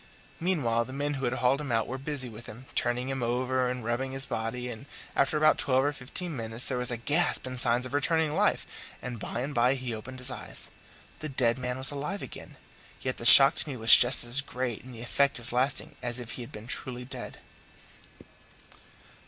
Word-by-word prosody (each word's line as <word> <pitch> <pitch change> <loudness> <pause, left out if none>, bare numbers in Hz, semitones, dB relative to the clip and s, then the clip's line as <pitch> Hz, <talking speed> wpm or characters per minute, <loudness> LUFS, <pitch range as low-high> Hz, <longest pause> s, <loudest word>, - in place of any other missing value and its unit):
Meanwhile 130 -10 0
the 130 - -10
men 145 +1 -1
who 135 -2 -3
had 120 - -1
hauled 130 +3 +1
him 145 -4 -5
out 115 -1 +1
were 130 +2 -6
busy 140 -2 -1
with 115 0 -11
him, 115 +5 -11
turning 125 +1 0
him 135 -1 -3
over 125 +1 0
and 125 -2 -5
rubbing 130 +3 -2
his 135 0 -2
body, 120 +2 -4
and 120 +3 -8 0.3
after 140 +3 +2
about 155 0 +3
twelve 130 -1 +2
or 145 - 0
fifteen 145 +5 -5
minutes 115 0 -3
there 125 -2 -2
was 125 - 0
a 120 - -2
gasp 150 +9 +1
and 130 -1 -5
signs 120 +1 +2
of 130 - -8
returning 155 +2 +1
life, 205 +5 +1 0.3
and 125 -3 -7
by 115 +4 -5
and 140 +3 -4
by 125 +2 +3
he 125 -3 -5
opened 120 +4 -8
his 125 +1 -2
eyes. - - -6 0.5
The 155 - -5
dead 125 -2 0
man 125 0 -3
was 130 +2 +3
alive 150 +8 -4
again; - - -10 0.5
yet 130 -1 -3
the 115 - -8
shock 135 +3 +11
to - - 0
me 135 - -5
was 115 0 +9
just 120 +1 +5
as 120 +3 +3
great 125 -4 -5
and 130 - -12
the 115 - -10
effect 140 +3 +1
as 120 +1 +3
lasting 135 +4 0
as 120 0 -3
if 120 -1 -8
he - - -7
had 120 - -9
been 105 +1 -10
truly 125 0 -3
dead. 130 - -8
130 Hz, 220 wpm, -28 LUFS, 120-140 Hz, 0.5 s, shock